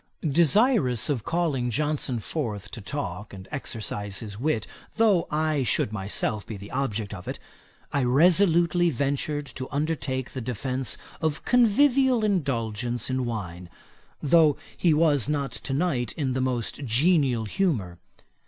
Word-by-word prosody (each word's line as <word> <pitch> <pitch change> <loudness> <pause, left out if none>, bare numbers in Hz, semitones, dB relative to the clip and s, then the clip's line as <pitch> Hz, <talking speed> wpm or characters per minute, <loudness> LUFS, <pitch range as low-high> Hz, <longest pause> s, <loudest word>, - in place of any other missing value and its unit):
Desirous 170 - +3
of 125 -7 -2
calling 155 -7 0
Johnson 145 0 -1
forth 105 - -3
to 115 - -7
talk, 105 -5 -5
and 95 -1 -11
exercise 105 -6 -3
his 105 -3 -7
wit, 135 -5 0 0.3
though 215 -6 +3
I 155 -1 0
should 110 -3 +1
myself 105 +1 -2
be 110 - -7
the 100 +1 -10
object 110 -6 -2
of 90 -3 -9
it, - - -4 0.6
I 140 - +1
resolutely 170 +5 +4
ventured 145 +1 -1
to 130 0 -6
undertake 140 -4 -2
the 130 - -5
defence 125 +1 -2 0.2
of 155 -2 -1
convivial 250 +1 +4
indulgence 120 - -1
in 130 -1 -1
wine, 90 -6 -5 0.5
though 155 -1 +5 0.2
he 175 - +2
was 150 -4 +3
not 140 -2 -1
to - - -6
night 135 -8 0
in 135 -5 -2
the 130 - -1
most 130 +1 -2
genial 135 -2 +2
humour. 105 - -1
135 Hz, 140 wpm, -26 LUFS, 115-160 Hz, 0.6 s, though